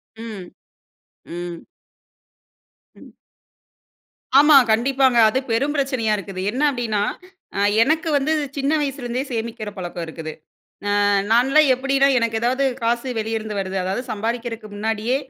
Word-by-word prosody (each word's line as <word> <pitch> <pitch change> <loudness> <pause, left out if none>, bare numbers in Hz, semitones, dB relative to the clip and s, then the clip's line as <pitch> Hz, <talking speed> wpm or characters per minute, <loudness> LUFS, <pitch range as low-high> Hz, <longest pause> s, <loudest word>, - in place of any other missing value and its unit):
ம், 220 -5 -8 0.8
ம். 175 0 -7 1.3
ம். - - -17 1.2
ஆமா 295 0 +6 0.2
கண்டிப்பாங்க. 260 +2 +2
அது 260 +5 0
பெரும் 275 +6 +1
பிரச்சனையா 260 -6 0
இருக்குது. 195 -1 -6
என்ன 255 +6 -3
அப்டின்னா, 225 -5 -1 0.5
அ - - 0 0.2
எனக்கு 315 +5 +1
வந்து 285 +3 0 0.3
சின்ன 280 +2 0
வயசுலருந்தே 265 -3 -3
சேமிக்கிற 225 -2 -4
பழக்கம் 175 -2 -5
இருக்குது. 160 -1 -7 0.7
ஆ - - +3 0.2
நான்லாம் 270 +6 +4
எப்டின்னா, 275 +1 +2
எனக்கு 230 -1 0
ஏதாவது 255 +3 +1 0.2
காசு 235 +2 -1
வெளியேருந்து 220 -1 -3
வருது, 190 0 -4
அதாவது 195 +7 -2
சம்பாரிக்கிறதுக்கு 225 0 -4
முன்னாடியே 220 +4 -1
230 Hz, 120 wpm, -21 LUFS, 215-270 Hz, 1.3 s, ஆமா